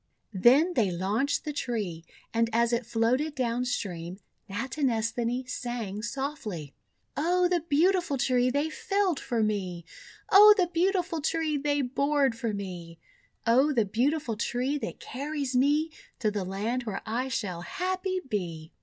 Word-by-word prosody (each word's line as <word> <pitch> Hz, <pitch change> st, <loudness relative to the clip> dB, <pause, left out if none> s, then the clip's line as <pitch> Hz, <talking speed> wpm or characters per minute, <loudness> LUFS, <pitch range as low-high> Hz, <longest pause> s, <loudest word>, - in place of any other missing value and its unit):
Then 260 Hz, -, +5 dB
they 225 Hz, -, +2 dB
launched 205 Hz, +11 st, -1 dB
the 300 Hz, -, -3 dB
tree, 210 Hz, -, -3 dB, 0.3 s
and 230 Hz, 0 st, +2 dB
as 235 Hz, +1 st, +2 dB
it 235 Hz, -1 st, -1 dB
floated 255 Hz, +7 st, +1 dB
down 245 Hz, -1 st, 0 dB
stream, 180 Hz, -7 st, -3 dB, 0.3 s
Natinesthani 240 Hz, +1 st, -1 dB
sang 240 Hz, -5 st, -4 dB
softly: 230 Hz, -, -4 dB, 0.2 s
— -, -, -47 dB
"0 355 Hz, +3 st, +3 dB
the 355 Hz, -1 st, +2 dB
beautiful 345 Hz, 0 st, +2 dB
Tree, 250 Hz, -1 st, +2 dB
they 285 Hz, +4 st, 0 dB
felled 390 Hz, -2 st, 0 dB
for 235 Hz, -4 st, -1 dB
me! 185 Hz, -5 st, -2 dB, 0.5 s
0 420 Hz, +2 st, +10 dB
the 355 Hz, -3 st, +1 dB
beautiful 350 Hz, -2 st, +1 dB
Tree, 315 Hz, 0 st, 0 dB
they 290 Hz, 0 st, 0 dB
bored 275 Hz, 0 st, +1 dB
for 230 Hz, -1 st, -2 dB
me! 180 Hz, -5 st, -6 dB, 0.5 s
0 265 Hz, +6 st, +4 dB
the 230 Hz, -5 st, +2 dB
beautiful 245 Hz, +4 st, 0 dB
Tree, 250 Hz, +6 st, -1 dB
that -, -, -6 dB
carries 280 Hz, 0 st, -4 dB
me 295 Hz, +5 st, +3 dB, 0.3 s
To 215 Hz, -3 st, 0 dB
the 205 Hz, -3 st, -3 dB
Land 220 Hz, +7 st, -2 dB
where 210 Hz, -3 st, -4 dB
I 240 Hz, +4 st, -1 dB
shall 200 Hz, -9 st, -3 dB
happy 370 Hz, -, -2 dB
be!'' 170 Hz, -8 st, -4 dB
250 Hz, 145 wpm, -28 LUFS, 215-295 Hz, 0.5 s, 0